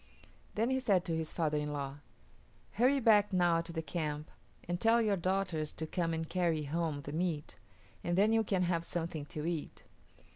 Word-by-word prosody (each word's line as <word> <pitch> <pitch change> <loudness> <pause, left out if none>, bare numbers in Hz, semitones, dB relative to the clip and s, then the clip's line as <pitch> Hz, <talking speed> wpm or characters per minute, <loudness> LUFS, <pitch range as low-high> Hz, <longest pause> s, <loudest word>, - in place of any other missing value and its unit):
Then 230 +4 +1
he 260 - +2
said 200 -8 +2
to 165 - -1
his 160 -1 -2
father 155 -3 0
in 150 0 -3
law, 140 -1 -4 0.7
"Hurry 255 +5 +3
back 210 -4 +5
now 175 -3 +3
to 165 0 -8
the 160 -1 -3
camp 150 0 -3 0.4
and 175 0 -2
tell 225 +1 +5
your 215 -3 +2
daughters 185 -4 -1
to 160 - -4
come 165 +1 -1
and 160 0 -2
carry 170 -4 0
home 155 0 -2
the 145 - -6
meat, 160 -2 -2 0.5
and 175 +1 0
then 210 +3 +4
you 225 0 +4
can 190 -3 +1
have 170 -1 0
something 165 -3 -3
to 150 +1 -5
eat." 165 -3 -4
170 Hz, 190 wpm, -33 LUFS, 155-195 Hz, 0.7 s, back